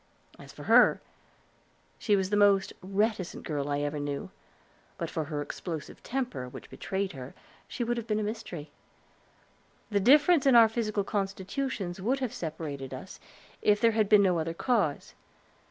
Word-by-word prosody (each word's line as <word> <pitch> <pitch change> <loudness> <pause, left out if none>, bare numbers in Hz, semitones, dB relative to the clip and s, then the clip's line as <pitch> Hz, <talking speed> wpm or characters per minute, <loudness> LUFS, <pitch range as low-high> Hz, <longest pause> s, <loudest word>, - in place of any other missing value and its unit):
As - - -12
for - - -11
her, - - +6 1.0
she 210 - +2
was 190 0 -1
the - - +3
most 200 -2 +4
reticent 200 0 -1
girl 145 -2 -2
I 145 0 0
ever 145 +1 -2
knew, 145 -1 -2
and - - -10 0.7
but - - -4
for 160 - -2
her 145 -1 -3
explosive 160 0 -7
temper, 240 - -3
which - - -11
betrayed 195 0 -3
her, 130 -3 -9 0.3
she 245 - -3
would 240 +1 -1
have 235 -1 -5
been 215 - 0
a - - -1
mystery. 180 -8 -6 1.2
The 205 - +2
difference 285 - +5
in 265 - +6
our 230 -1 +9
physical 215 -3 -1
constitutions 195 0 -3
would 250 +8 +1
have 255 -4 -3
separated 150 -5 -5
us, - - -10 0.4
if 205 0 +3
there 230 0 +4
had 215 -2 +1
been 210 -2 +7
no 180 -3 +2
other 165 +1 -3
cause. 200 - 0
195 Hz, 170 wpm, -29 LUFS, 160-225 Hz, 1.2 s, our